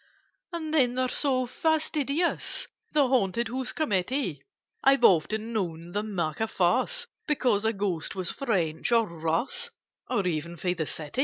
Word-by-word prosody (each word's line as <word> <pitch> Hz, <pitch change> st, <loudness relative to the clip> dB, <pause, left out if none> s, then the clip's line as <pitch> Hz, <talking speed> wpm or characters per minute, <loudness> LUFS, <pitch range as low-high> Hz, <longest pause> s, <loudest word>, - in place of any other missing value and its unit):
"And 320 Hz, -3 st, -4 dB
then 250 Hz, -5 st, +4 dB
they're 255 Hz, 0 st, +1 dB
so 255 Hz, -1 st, +1 dB
fastidious, 315 Hz, +2 st, 0 dB, 0.2 s
The 290 Hz, -3 st, +4 dB
Haunted 235 Hz, -2 st, +1 dB
House 255 Hz, +1 st, -2 dB
Committee: 205 Hz, -, -1 dB, 0.4 s
I've 270 Hz, 0 st, +5 dB
often 215 Hz, +6 st, +3 dB
known 170 Hz, -5 st, -3 dB
them 205 Hz, +1 st, -3 dB
make 155 Hz, -4 st, -1 dB
a 220 Hz, -, +1 dB
fuss 240 Hz, -, +1 dB, 0.2 s
Because 245 Hz, -8 st, +2 dB
a 225 Hz, -, +2 dB
Ghost 195 Hz, -6 st, -2 dB
was 185 Hz, -2 st, -2 dB
French, 190 Hz, -, -1 dB
or 230 Hz, -1 st, +5 dB
Russ, 170 Hz, -, -1 dB, 0.4 s
Or 200 Hz, -, +1 dB
even 170 Hz, 0 st, -2 dB
from 180 Hz, +1 st, 0 dB
the 160 Hz, -4 st, -3 dB
City! 155 Hz, -, -4 dB
220 Hz, 150 wpm, -27 LUFS, 175-270 Hz, 0.4 s, I've